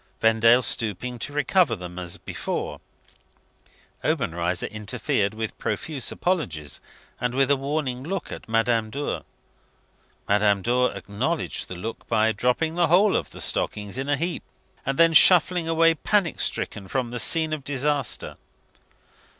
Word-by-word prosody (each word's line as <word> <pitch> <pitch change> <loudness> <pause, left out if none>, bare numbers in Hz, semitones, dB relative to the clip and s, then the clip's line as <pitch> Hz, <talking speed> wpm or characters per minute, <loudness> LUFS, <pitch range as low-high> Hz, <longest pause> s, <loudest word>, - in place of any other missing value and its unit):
Vendale 115 +2 +5
stooping 120 +3 -2
to - - -3
recover 145 -1 +2
them 90 -2 -8
as 90 -1 -4
before, - - -5 1.2
Obenreizer 85 +2 -1
interfered 105 -1 -2
with 110 -1 -4
profuse 145 -6 -2
apologies, 85 - -2 0.4
and 125 0 -2
with 135 +1 +3
a - - +5
warning 135 -2 -2
look 175 +5 -4
at - - -9
Madame 115 0 +1
Dor. 140 +5 -4 1.0
Madame 100 -1 +2
Dor 125 +3 +2
acknowledged 130 +12 -3
the 90 - -7
look 110 +6 -7
by 110 -1 +2
dropping 125 +9 0
the 170 0 +2
whole 190 +5 +4
of - - -1
the - - -11
stockings 105 +3 0
in 135 +2 -3
a 145 - +2
heap, 170 +3 -2 0.5
and 135 0 -1
then 165 0 +5
shuffling 175 0 +6
away 165 0 +4
panic 180 +2 0
stricken 95 - -2
from 125 +3 -2
the 120 - -3
scene 160 +6 +2
of 150 -3 -4
disaster. 140 -1 -1
125 Hz, 140 wpm, -24 LUFS, 110-155 Hz, 1.2 s, shuffling